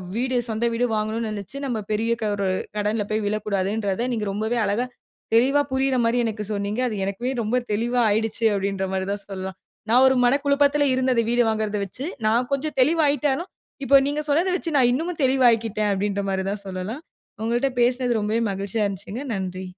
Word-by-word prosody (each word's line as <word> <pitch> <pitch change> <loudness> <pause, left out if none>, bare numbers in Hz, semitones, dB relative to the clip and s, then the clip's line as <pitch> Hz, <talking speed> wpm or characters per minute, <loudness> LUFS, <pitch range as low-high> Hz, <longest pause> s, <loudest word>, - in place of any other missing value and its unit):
வீடு, 255 +1 0
சொந்த 220 +2 -1
வீடு 245 +2 +1
வாங்கணும் 215 +2 -1
நெனச்சி 210 +6 -6
நம்ம 240 -5 -2
பெரிய 225 +2 0 0.2
ஒரு, 200 -1 -1 0.3
கடன்ல 210 +1 0
போயி 215 0 +1
விழக்கூடாதுன்றத 205 +1 -1
நீங்க 215 -2 -2
ரொம்பவே 220 +3 -1
அழகா, 210 +5 0 0.5
தெளிவா 270 +5 +4
புரியிற 265 0 +1
மாரி 235 +2 +2
எனக்கு 215 -1 -3
சொன்னீங்க. 205 +4 -2
அது 215 - -4
எனக்குமே 235 +7 -2
ரொம்ப 230 +4 0
தெளிவா 240 +4 0
ஆயிடுச்சி 220 +2 -1
அப்டின்ற 195 0 -1
மாரி 190 0 -1
தான் 200 0 -4
சொல்லலாம். 190 -1 -6 0.3
நான் 250 +3 +6
ஒரு 265 - +4
மனக்குழப்பத்துல 285 +2 +3
இருந்தது 255 -2 +2
வீடு 240 0 +3
வாங்குறத 215 -1 -1
வச்சி, 255 +9 -7 0.2
நான் 240 +3 +2
கொஞ்சம் 300 +2 -2
தெளிவாயிட்டாலும், 295 +2 +2 0.3
இப்ப 275 0 +7
நீங்க 295 +1 -1
சொன்னத 340 +6 +2
வச்சி 335 - -4
நான் 245 -2 +5
இன்னமும் 325 +3 -2
தெளிவாயிகிட்டேன், 230 -5 +3
அப்டின்ற 200 +1 -1
மாரிதான் 195 +2 -2
சொல்லலாம். 190 - -5 0.4
உங்கள்ட்ட 240 +4 +1
பேசுனது 245 -1 +2
ரொம்பவே 220 +3 0
மகிழ்ச்சியா 200 +2 -1
இருந்துச்சிங்க. 200 +6 -6
நன்றி. 185 -1 -4
230 Hz, 165 wpm, -23 LUFS, 205-260 Hz, 0.5 s, இப்ப